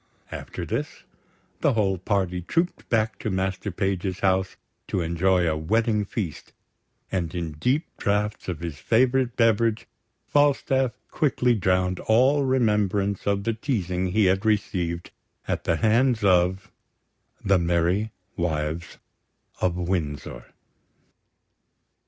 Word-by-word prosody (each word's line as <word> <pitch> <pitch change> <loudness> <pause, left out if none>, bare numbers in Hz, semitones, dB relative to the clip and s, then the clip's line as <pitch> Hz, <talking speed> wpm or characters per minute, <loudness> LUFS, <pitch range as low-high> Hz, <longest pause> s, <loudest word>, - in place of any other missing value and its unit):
After - - -6
this, - - -4 0.6
the 145 - +2
whole 100 -4 +1
party 95 -2 -1
trooped 170 - -2
back 110 -1 +1
to - - -3
Master 95 +1 -2
Page's 95 0 -2
house, 95 0 +1 0.3
to - - -1
enjoy 85 +2 +2
a 80 - +1
wedding 105 +6 +1
feast; 100 -6 -5 0.6
and 90 -3 -2
in 85 -2 -3
deep 125 - 0
draughts 105 +1 -1
of 85 -3 -4
his 80 -4 -5
favourite 125 +1 +2
beverage, 115 -1 +2 0.4
Falstaff 135 -3 +2 0.2
quickly 125 -4 +2
drowned 90 -3 +1
all 130 +6 +4
remembrance 105 -6 +1
of 100 -1 +1
the 115 - 0
teasing 95 - -1
he 100 +3 +2
had 95 +1 +2
received 90 -5 -1 0.4
at - - -2
the 85 - +2
hands 115 +4 +2
of 95 0 +2 0.7
the 100 -2 +4
Merry 85 +5 +1 0.2
Wives 80 -1 -2 0.6
of 90 -2 +1
Windsor. 75 -9 -3
95 Hz, 120 wpm, -25 LUFS, 90-110 Hz, 0.7 s, all